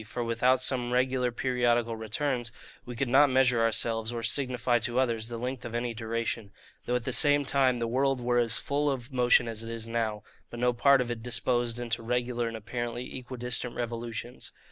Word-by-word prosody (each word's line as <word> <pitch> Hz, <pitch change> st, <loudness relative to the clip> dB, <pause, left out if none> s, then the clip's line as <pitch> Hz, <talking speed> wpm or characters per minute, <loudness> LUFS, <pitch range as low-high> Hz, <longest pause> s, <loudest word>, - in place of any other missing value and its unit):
For 115 Hz, +3 st, -4 dB
without 125 Hz, +3 st, +2 dB
some 125 Hz, -2 st, +1 dB
regular 125 Hz, 0 st, +1 dB
periodical 120 Hz, -2 st, +1 dB
returns, 120 Hz, +2 st, -2 dB, 0.4 s
we 125 Hz, -, -6 dB
could 135 Hz, +3 st, -1 dB
not 140 Hz, +4 st, +5 dB
measure 130 Hz, -2 st, +3 dB
ourselves, 115 Hz, 0 st, 0 dB
or 120 Hz, -1 st, -4 dB
signify 125 Hz, -1 st, +1 dB
to 120 Hz, +2 st, -3 dB
others, 115 Hz, -4 st, +1 dB
the 120 Hz, 0 st, -5 dB
length 125 Hz, +2 st, -4 dB
of 120 Hz, -1 st, -6 dB
any 120 Hz, 0 st, -1 dB
duration; 115 Hz, -1 st, -3 dB, 0.4 s
though 125 Hz, -, +1 dB
at 125 Hz, -, -1 dB
the -, -, -2 dB
same 145 Hz, -1 st, +4 dB
time 130 Hz, -2 st, +2 dB
the 115 Hz, -, -1 dB
world 135 Hz, +2 st, +1 dB
were 120 Hz, 0 st, +1 dB
as 115 Hz, -2 st, +1 dB
full 145 Hz, +1 st, 0 dB
of 130 Hz, -1 st, -4 dB
motion 125 Hz, -1 st, +4 dB
as 115 Hz, -1 st, -4 dB
it 115 Hz, -, -7 dB
is 115 Hz, -1 st, -4 dB
now, 110 Hz, -3 st, -2 dB, 0.3 s
but 120 Hz, -, -8 dB
no 125 Hz, 0 st, +2 dB
part 135 Hz, +2 st, +5 dB
of 120 Hz, -1 st, -2 dB
it 115 Hz, -1 st, -4 dB
disposed 120 Hz, 0 st, 0 dB
into 120 Hz, -1 st, -2 dB
regular 120 Hz, 0 st, -1 dB
and 115 Hz, 0 st, -4 dB
apparently 120 Hz, +2 st, -5 dB
equidistant 125 Hz, -1 st, -3 dB
revolutions. 120 Hz, 0 st, -5 dB
120 Hz, 195 wpm, -29 LUFS, 115-125 Hz, 0.4 s, not